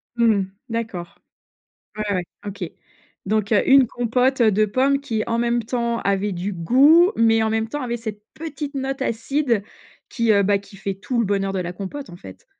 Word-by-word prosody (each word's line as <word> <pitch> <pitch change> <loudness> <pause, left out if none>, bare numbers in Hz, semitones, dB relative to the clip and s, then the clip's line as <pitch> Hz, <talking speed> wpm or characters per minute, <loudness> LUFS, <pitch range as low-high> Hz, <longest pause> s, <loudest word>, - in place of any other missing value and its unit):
Mmh 235 - +2
mh. 195 -1 0 0.2
D'accord. 220 -7 -5 0.8
Ouais, 215 - -2
ouais. 180 -2 0 0.2
OK. 190 -4 -5 0.6
Donc 215 +1 0
heu, 205 - +3
1 270 -2 +6
compote 245 +2 +1
de 215 -1 +4
pommes 270 +6 +2
qui 225 -6 -2
en 230 0 -1
même 240 0 +1
temps 235 0 -1
avait 200 +1 0
du 185 +3 -3
goût, 280 - +5
mais 225 -1 +4
en 220 - +1
même 225 0 0
temps 295 +5 -4
avait 240 -1 -2
cette 215 -2 -7
petite 300 -2 -6
note 270 0 -3
acide 240 -1 0 0.5
qui 230 -2 0
heu, 200 -1 +4
bah, 200 0 +2
qui 200 0 -15
fait 195 0 -3
tout 235 +6 -3
le 230 - +2
bonheur 195 -1 0
de 190 - -2
la 175 0 -4
compote, 200 +5 -7
en 175 - -10
fait? 95 - -13
225 Hz, 195 wpm, -22 LUFS, 200-255 Hz, 0.8 s, 1